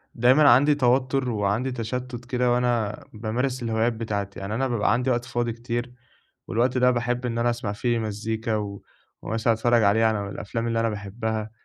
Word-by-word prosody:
دايمًا 130 +5 +5
عندي 145 +5 +5
توتر 130 0 +1
وعندي 110 +4 0
تشتُّت 125 +1 -5
كده 125 0 +1
وأنا 120 -4 0
بامارس 120 +4 -2
الهوايات 115 +1 +1
بتاعتي، 105 -3 -4
يعني 100 +2 -4
أنا 135 +3 0
بابقى 115 -3 +1
عندي 125 +2 0
وقت 120 -1 0
فاضي 120 -2 -2
كتير، 120 +1 -4 0.5
والوقت 125 +3 +1
ده 125 0 +4
باحب 120 +1 -1
إن 115 -1 -2
أنا 120 +1 +2
أسمع 120 -3 -2
فيه 120 +2 0
مزيكا 110 +1 -2
و 100 -2 -4 0.4
ومثلًا 115 +1 +1
أتفرّج 120 +1 +2
عليه 105 +3 +4
على 105 -3 0
الأفلام 115 +3 -4
اللي 115 0 0
أنا 115 0 +1
باحبها، 110 +1 -4
115 Hz, 175 wpm, -25 LUFS, 110-125 Hz, 0.5 s, دايمًا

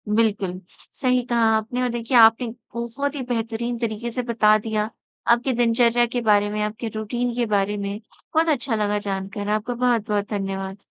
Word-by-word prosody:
बिल्कुल, 200 -5 +1 0.3
सही 255 -2 +1
कहा 235 -2 +2
आपने 225 +3 -3
और 250 - +1
देखिए 240 +1 0
आपने 225 +2 +6 0.3
बहुत 265 +5 -3
ही 280 - -3
बेहतरीन 235 +1 -2
तरीके 230 0 -3
से 250 - -2
बता 220 -3 +4
दिया। 215 0 -2 0.4
आपके 240 +3 +3
दिनचर्या 240 0 +3
के 245 +1 -3
बारे 205 0 +4
में, 210 0 -2
आपके 215 +2 -4
रूटीन 240 +3 -2
के 245 - +1
बारे 200 +1 +1
में, 200 +1 -4 0.3
बहुत 320 +1 +3
अच्छा 260 -4 0
लगा 210 -1 0
जानकर। 195 +2 -4
आपका 215 +3 -1
बहुत-बहुत 225 -4 0
धन्यवाद। 195 -1 -3
225 Hz, 170 wpm, -23 LUFS, 210-240 Hz, 0.4 s, आपने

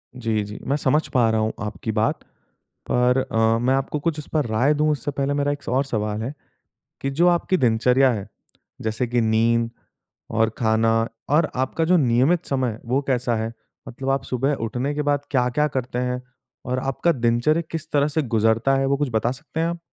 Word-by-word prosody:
जी, 115 -4 -1
जी। 105 +1 -8
मैं 140 - +2
समझ 150 +2 +1
पा 120 -3 +4
रहा 110 0 +1
हूँ 110 0 0
आपकी 105 +1 -4
बात। 110 +1 0 0.7
पर 125 +1 +3
अ, 115 0 +3
मैं 125 +3 +2
आपको 135 +2 -2
कुछ 160 0 -1
इस 150 - -8
पर 155 -3 +2
राय 120 +7 +2
दूँ 150 +1 +1
उससे 145 0 -2
पहले 140 0 -1
मेरा 145 0 +1
एक 145 0 -6
और 135 +2 +1
सवाल 105 -3 -2
है 130 +5 -4 0.7
कि 135 - -1
जो 160 +6 +2
आपकी 175 +2 +1
दिनचर्या 125 +1 +3
है, 105 -2 -5 0.5
जैसे 110 +3 -1
कि 120 0 +1
नींद 115 +1 +2 0.6
और 115 0 +2
खाना 110 0 +2 0.4
और 150 +2 +3
आपका 130 +5 0
जो 180 +2 +4
नियमित 135 +5 +2
समय 130 -2 0
है 110 - -10
वो 130 +4 +1
कैसा 125 -3 +1
है? 110 0 -2 0.4
मतलब 135 +3 -5
आप 135 0 +1
सुबह 135 +3 0
उठने 125 +5 -2
के 150 - 0
बाद 145 -1 +1
क्या-क्या 125 +3 +2
करते 125 -1 -2
हैं? 125 0 -2 0.4
और 125 +1 -1
आपका 135 +6 0
दिनचर्या 120 +4 +2
किस 160 0 -5
तरह 145 0 +3
से 150 +1 0
गुज़रता 115 +1 +2
है? 135 - +1
वो 140 +1 +1
कुछ 145 -1 -1
बता 110 +2 +1
सकते 155 +4 -7
हैं 165 - +2
आप। 170 0 -3
130 Hz, 200 wpm, -23 LUFS, 115-145 Hz, 0.7 s, पा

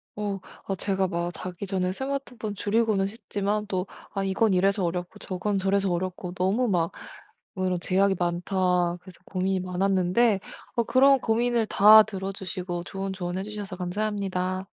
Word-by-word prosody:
어 205 -2 -3 0.3
아 195 - -1
제가 190 0 0
막 170 0 -2
자기 185 +2 -6
전에 185 -1 -1
스마트폰 260 -4 -4
줄이고는 205 -1 +1
싶지만 210 0 -2
또 185 -1 -2 0.3
'아 195 - -1
이건 195 +2 +2
이래서 195 +2 +2
어렵고 175 +1 -3
저건 195 +2 -2
저래서 195 0 +1
어렵고 180 0 -3
너무 190 +7 +1
막 170 -5 +1 0.6
어 185 -1 -1
이런 180 -1 0
제약이 195 +2 +2
많다.' 180 0 +1
그래서 185 -1 -14
고민이 190 0 -1
많았는데 190 +3 +2 0.4
어 235 - +4
그런 270 +3 +5
고민을 235 0 +1
다 215 +2 +8
들어 195 -2 -5
주시고 185 -2 -4
좋은 195 +2 -4
조언해 180 0 -3
주셔서 205 -2 -6
감사합니다. 185 -1 -2
195 Hz, 340 characters per minute, -26 LUFS, 180-210 Hz, 0.6 s, 다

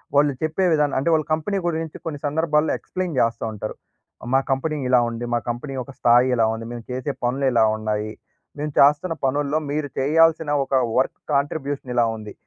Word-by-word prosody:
వాళ్ళు 145 0 +4
చెప్పే 160 +4 0
విధానం 150 -2 +1
అంటే 155 +5 0
వాళ్ళ 155 -2 +2
కంపెనీ 180 +6 -1
గురించి 160 -2 -3
కొన్ని 155 -3 -4
సందర్భాల్లో 150 +1 +1
ఎక్స్‌ప్లేన్ 185 -5 -4
జేస్తా 115 0 +1
ఉంటారు. 105 +1 -5 0.6
"మా - - +6
కంపెనీ 150 +4 0
ఇలా 125 -1 +6
ఉంది. 115 +1 -5
మా 120 - +2
కంపెనీ 120 +4 -4
యొక్క 130 +2 -7
స్థాయి 120 +2 +5
ఇలా 115 -2 +3
ఉంది. 115 0 -6
మేము 120 -1 -7
చేసే 130 +3 -3
పనులు 130 +3 0
ఇలా 110 -2 +5
ఉన్నాయి. 110 0 -2 0.5
మేము 150 -1 -3
చేస్తున్న 150 +5 +4
పనుల్లో 145 +3 +1
మీరు 150 0 -1
చేయాల్సిన 160 +2 +3 0.2
ఒక - - -7 0.2
వర్క్ 130 - +1
కాంట్రిబ్యూషన్ 140 -2 -1
ఇలా 120 -1 +4
ఉంది." 105 -1 -9
140 Hz, 180 wpm, -22 LUFS, 120-155 Hz, 0.6 s, మా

